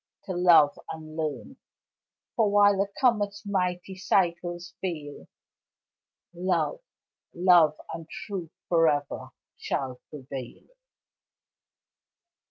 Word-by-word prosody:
to - - -6
love 175 -5 +5
and 155 -1 -9
learn, 155 - -4 0.8
For 220 -3 +3
while 205 -1 +5
a 200 - 0
comet's 210 -4 +1
mighty 185 -1 -1
cycles 175 -2 0
fail, 155 -6 -5 1.1
Love, 180 - 0 0.6
love 175 -4 +5
and 165 -1 -7
truth 190 -6 -6 0.2
forever 155 -4 +1 0.3
shall 130 -2 -3
prevail. 135 -4 -8
175 Hz, 85 wpm, -27 LUFS, 155-195 Hz, 1.1 s, love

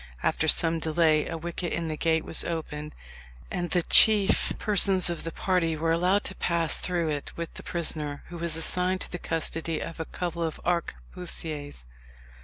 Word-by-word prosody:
After - - +1
some 165 0 +4
delay 155 -1 +2
a 165 - -4
wicket 170 +1 -5
in 170 -1 -2
the 155 - -3
gate 160 0 0
was - - +1
opened, 150 -2 -5 0.6
and 175 -1 -3
the 175 +1 +1
chief 210 0 +5
persons 195 -3 +4
of 170 - -5
the 165 - -4
party 165 -3 0
were 165 +1 0
allowed 180 +5 +2
to - - -4
pass 170 -2 +1
through 175 -3 -1
it 145 -2 -4
with 170 -1 -5
the - - -9
prisoner, 155 -4 -3
who 170 -1 -8
was 170 -1 -1
assigned 180 +3 +1
to - - 0
the 175 - -5
custody 165 0 -2
of 165 - -7
a 160 - -3
couple 170 0 -5
of 160 -2 -3
arquebusiers. 150 - -3
165 Hz, 180 wpm, -27 LUFS, 160-175 Hz, 0.6 s, chief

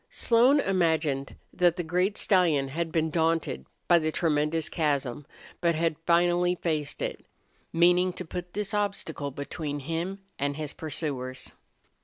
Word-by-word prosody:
Slone 245 +5 +4
imagined 160 - +1 0.2
that 175 -1 +3
the 175 - -1
great 180 +5 0
stallion 165 -9 +3
had 165 +3 -3
been 160 -1 0
daunted 160 - 0 0.2
by 175 - +6
the 155 -1 -1
tremendous 155 0 0
chasm, 145 -4 -1 0.3
but 170 -1 +2
had 165 0 +1
finally 175 +1 +3
faced 155 -5 -2
it, - - -4 0.5
meaning 180 +2 +4
to 180 - -6
put 175 +2 -6
this 205 0 -3
obstacle 200 -8 -2
between 145 +2 -5
him 170 +7 -4 0.2
and 140 0 -1
his 155 -2 -5
pursuers. 140 -5 -4
165 Hz, 140 wpm, -27 LUFS, 150-180 Hz, 0.5 s, by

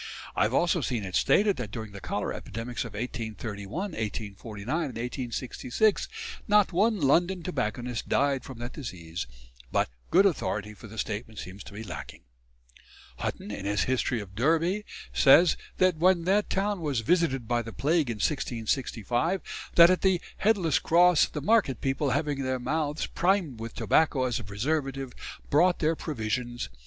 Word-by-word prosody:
I - - 0
have 105 +3 +2
also 175 +1 +2
seen 120 -5 -1
it 95 -2 -6
stated 200 - +3
that 125 -5 -4
during 110 -1 -6
the 100 -1 -9
cholera - - -2
epidemics 120 +2 -5
of 115 - -8
1831, 110 - -4
1849, 105 - -5
and 150 -9 -2
1866 125 - -1 0.4
not 205 -3 +4
one 210 +4 +3
London 175 +5 +2
tobacconist 125 -6 -3
died 140 -2 +2
from 130 - -9
that 120 +1 -6
disease; 85 - -6 0.4
but - - +1 0.2
good 190 +4 +5
authority 105 - 0
for 110 - -12
the 110 +2 -11
statement 110 +1 -4
seems 95 +1 -8
to - - -11
be 105 +2 -6
lacking. 85 - -8 1.0
Hutton, 105 - -4
in 100 -1 -6
his 100 -2 +1
"History 130 -2 0
of 100 -3 -9
Derby," 165 - +1 0.3
says 165 +5 +6 0.2
that 185 -3 +3
when 175 +1 +4
that 200 +4 +2
town 200 -1 0
was 140 -7 0
visited 135 -3 +1
by 120 0 +1
the 115 0 -7
plague 150 +2 +1
in 115 - -1
1665, 120 - -1 0.4
that 170 +1 +9
at 185 - +1
the 190 -2 +3 0.2
"Headless 195 -8 +2
cross... 175 -1 +5
the 150 - -5
market 195 - +2
people, 135 +1 0
having 145 0 0
their 130 -1 -1
mouths 150 +4 -1
primed 175 - 0
with 115 0 -6
tobacco 145 -4 +2
as 125 -2 0
a - - -7
preservative, 135 +5 -2 0.4
brought 175 +5 +4
their 160 +1 +1
provisions.... 120 - -3
130 Hz, 160 wpm, -28 LUFS, 110-170 Hz, 1.0 s, that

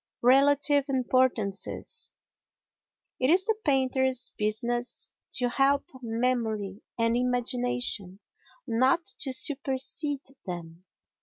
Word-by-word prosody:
Relative 280 +2 +4
Importances 255 -6 0 1.1
It 255 - +2
is 370 +3 +4
the 445 - +1
painter's 260 -2 +1
business 235 +3 -1 0.2
to 250 - +2
help 275 +2 +2 0.2
memory 225 -4 -2 0.2
and 230 0 +2
imagination, 245 -5 0 0.5
not 260 +9 +2
to 270 - -1
supersede 270 +2 +1 0.2
them. 170 0 -7
250 Hz, 85 wpm, -27 LUFS, 230-270 Hz, 1.1 s, Relative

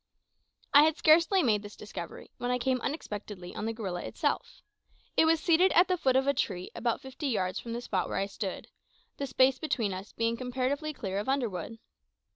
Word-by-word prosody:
I 285 - +10
had 315 +1 +3
scarcely 335 +4 +5
made 215 -5 +3
this 205 0 -10
discovery 190 -5 -8
when 245 - -2
I 250 - +2
came 255 0 0
unexpectedly 210 - -5
on 215 - -4
the - - 0
gorilla 195 -6 -4
itself. - - -2 0.5
It - - +5
was 325 0 +4
seated 345 +3 +4
at 350 +2 +6
the 370 - +2
foot 265 -7 +1
of 265 0 +3
a 280 - +3
tree 185 -8 -2
about 235 -1 -1
fifty 265 +3 -5
yards 185 -7 -1
from 230 - -6
the 240 - -3
spot 195 -6 -1
where - - -2
I 195 - +1
stood, 195 -1 -5 0.5
the 280 - -3
space 260 0 +3
between 230 -10 -1
us 190 +3 -7
being 230 0 -1
comparatively 260 +5 -2
clear 195 -8 -3
of 210 - -3
underwood. 225 -6 -2
245 Hz, 200 wpm, -30 LUFS, 205-285 Hz, 0.5 s, I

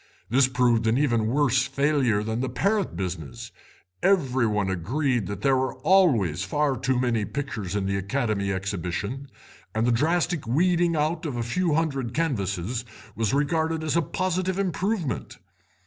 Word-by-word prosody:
This 130 +1 +5
proved 125 -3 +2
an 110 +2 +3
even 120 -6 +2
worse 130 0 +2
failure 135 -6 +1
than 110 +1 -2
the 130 - -1
parrot 200 - 0
business; 85 -7 -5 0.5
every 130 -11 +2
one 105 -2 0
agreed 120 - -1
that 100 +1 -5
there 135 +3 +3
were 130 0 -1
always 120 - +3
far 140 +9 0
too 130 0 0
many 120 -4 +1
pictures 110 -7 -4
in 100 -2 0
the 100 0 0
Academy 100 -1 -1
Exhibition, 100 +7 -3 0.5
and 110 +1 +1
the 125 - +3
drastic 160 +3 +1
weeding 170 +5 +2
out 155 +2 0
of 140 - -4
a 120 - -1
few 165 +6 0
hundred 135 -7 -1
canvases 115 - -1 0.3
was 110 -2 0
regarded 160 +3 0
as 155 - -1
a 170 - +4
positive 185 +3 -1
improvement. 185 - -2
130 Hz, 155 wpm, -25 LUFS, 105-155 Hz, 0.5 s, This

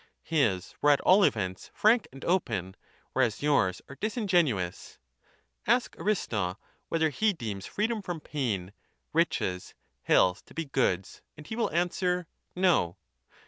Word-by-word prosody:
His 115 - 0
were 145 - +4
at 145 - +5
all 195 +2 +6
events 95 - 0
frank 225 +3 +4
and 135 +1 -10
open, 110 - 0 0.4
whereas 125 -2 +1
yours 100 -11 +2
are 140 - -11
disingenuous. 175 - 0 0.7
Ask 250 - +2
Aristo 105 - -1 0.3
whether 160 -1 +2
he 215 +8 +2
deems 110 - -5
freedom 220 +1 -1
from 175 -4 -5
pain, 105 -12 -3 0.4
riches, 95 - 0 0.3
health 90 +2 +3
to - - -17
be 165 0 -2
goods, 125 -9 -1 0.2
and 150 - -11
he 220 - -5
will 235 - 0
answer 180 +1 0 0.3
No. 175 - +2
145 Hz, 135 wpm, -29 LUFS, -, 0.7 s, all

